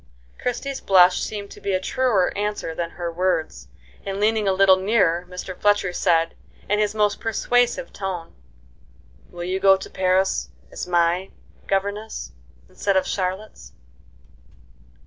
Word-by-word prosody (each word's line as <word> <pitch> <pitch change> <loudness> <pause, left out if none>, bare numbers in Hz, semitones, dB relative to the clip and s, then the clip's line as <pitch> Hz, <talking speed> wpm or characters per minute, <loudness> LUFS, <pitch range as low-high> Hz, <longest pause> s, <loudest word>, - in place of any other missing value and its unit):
Christie's 270 +2 -3
blush 180 -2 +5
seemed 205 -2 -5
to - - -12
be 200 - -1
a 185 - +2
truer 215 -2 +1
answer 205 -5 -2
than 170 +1 -3
her 170 0 -5
words, 165 - -1 0.4
and, 195 0 -4
leaning 215 0 +2
a - - +4
little 190 0 +5
nearer, 185 -4 +1
Mr. 180 0 -7
Fletcher 205 -2 +2
said, 165 -1 +2 0.3
in 210 +1 +1
his 210 0 0
most 210 -1 +1
persuasive 245 +3 0
tone: 185 -4 -5 1.0
"Will 175 0 -7
you 185 +2 -2
go 195 0 +6
to 190 - -9
Paris 185 - +1 0.2
as - - -6
my 175 +1 +1 0.4
governess, 200 - -2 0.4
instead 200 -2 0
of 190 - +2
Charlotte's?" 185 - -4
190 Hz, 140 wpm, -23 LUFS, 180-210 Hz, 1.0 s, go